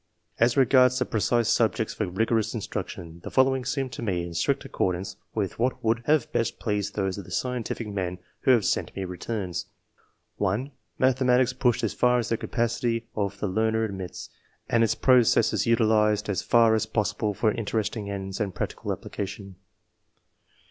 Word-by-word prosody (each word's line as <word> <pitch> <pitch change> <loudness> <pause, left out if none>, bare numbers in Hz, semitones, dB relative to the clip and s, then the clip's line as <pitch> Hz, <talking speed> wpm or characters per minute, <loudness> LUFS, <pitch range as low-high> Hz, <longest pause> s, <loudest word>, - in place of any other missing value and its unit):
As 120 +2 +3
regards 130 -1 +5
the 130 - +1
precise 115 +1 +1
subjects 115 -1 +1
for 105 - -2
rigorous 110 +3 0
instruction, 90 -5 -6
the - - -5
following 130 0 +3
seem 135 +1 -1
to - - -7
me 90 -6 -1
in 85 - -7
strict 85 - 0
accordance 90 +1 -2 0.2
with 100 -3 -2
what 125 +2 0
would 115 +1 +1
have 150 -4 +2
best 115 - -1
pleased 105 -2 -2
those 95 -1 -1
of - - -7
the - - -13
scientific 125 -2 -2
men 95 -3 -3 0.2
who - - -1
have 120 -6 +5
sent - - -1
me 95 - -3
returns: 90 0 -4 0.4
— - - -42
1. 105 +8 -1 0.3
Mathematics 130 -1 +3
pushed 120 -3 +1
as - - 0
far 125 0 +3
as 120 - -1
the 115 - +1
capacity 115 0 -1
of 100 -1 -2
the 105 - -1
learner 110 +3 +1
admits, 95 -4 -6 0.4
and 115 -1 +3
its 115 - +2
pro 130 -1 +5
cesses 115 - +2
utilized 110 -2 +3
as 100 - 0
far 115 -1 +4
as 110 0 +1
possible 105 -1 -1
for 110 +1 +2
interesting 110 -1 -2
ends 95 -1 -5
and 100 -4 -2
practical - - -3
application. 100 -1 -6
110 Hz, 175 wpm, -26 LUFS, 100-120 Hz, 0.4 s, regards